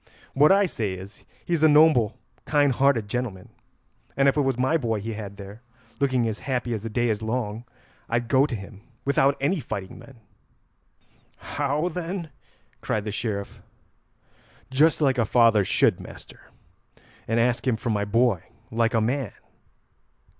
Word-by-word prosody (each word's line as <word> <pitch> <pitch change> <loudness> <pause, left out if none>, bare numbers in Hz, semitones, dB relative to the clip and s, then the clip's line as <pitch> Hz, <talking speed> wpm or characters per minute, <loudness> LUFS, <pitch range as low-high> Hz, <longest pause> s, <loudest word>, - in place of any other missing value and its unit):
What 150 +5 +5
I 200 +1 +5
say 105 - -3
is, 95 +3 -11 0.2
he's 170 -3 0
a 155 - +7
noble 150 -8 +4 0.3
kind 145 -2 +3
hearted 130 -4 +2
gentleman, 105 -5 -4 0.7
and 135 0 +4
if 135 - +3
it 150 - +2
was 135 -3 0
my 130 +5 +1
boy 115 -8 0
he 110 +3 -5
had 100 -2 -7
there, 100 +3 -10 0.4
looking 130 -4 +1
as 110 -1 -4
happy 125 -3 -2
as 110 - -3
the 115 - -5
day 120 +2 0
is 110 -1 -1
long, 110 0 -3 0.4
I'd 120 0 -1
go 130 +4 +3
to 125 - -4
him 100 0 -10 0.2
without 140 0 +2
any 160 +7 0
fighting 95 -8 -6
men." 135 -4 -15 1.2
"How, 145 +3 -2
then?" 175 -1 -5 0.5
cried 105 -1 -2
the 105 - -3
Sheriff. 105 -2 -4 1.1
"Just 155 +5 +3
like 135 -3 +2
a - - +4
father 115 -2 +4
should, - - +2
master, - - -13 0.8
and 115 +1 +1
ask 120 +2 +1
him 120 -3 +2
for 120 0 -2
my 105 -1 0
boy 110 -2 +2 0.3
like 115 +1 +1
a 115 - +3
man." 125 0 -1
120 Hz, 160 wpm, -25 LUFS, 110-140 Hz, 1.2 s, a